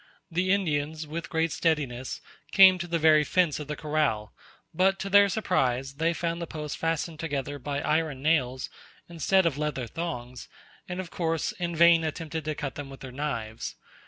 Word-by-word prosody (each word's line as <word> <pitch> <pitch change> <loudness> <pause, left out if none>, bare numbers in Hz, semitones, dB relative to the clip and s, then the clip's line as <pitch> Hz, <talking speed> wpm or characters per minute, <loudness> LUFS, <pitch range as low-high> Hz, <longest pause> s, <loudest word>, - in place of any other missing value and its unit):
The 180 +3 +1
Indians, 155 -5 0
with 165 +3 -6
great 160 0 0
steadiness, 135 -6 -1 0.3
came 190 -2 +8
to 175 - -4
the 170 0 0
very 155 -1 +5
fence 170 -1 +1
of 150 - -6
the 150 - -3
corral: 150 -9 -1 0.4
but 190 +3 +3
to 195 0 -5
their 200 0 +7
surprise 135 - 0
they 165 +2 +2
found 170 0 -2
the 170 - -4
posts 150 -2 -5
fastened 165 0 -2
together 145 -2 -3
by 140 +2 -3
iron 150 -3 0
nails 130 -5 +1 0.4
instead 170 +3 +2
of 150 -4 0
leather 150 -4 -2
thongs, 125 -4 -6 0.4
and, 180 +1 -4
of 185 -3 -6
course, 165 -2 -1
in 175 -2 -4
vain 170 0 +6
attempted 160 0 -4
to 155 -1 -2
cut 145 -3 -4
them 145 -1 -7
with 135 - -11
their 130 - -8
knives. 115 -5 -4
155 Hz, 180 wpm, -27 LUFS, 145-170 Hz, 0.4 s, came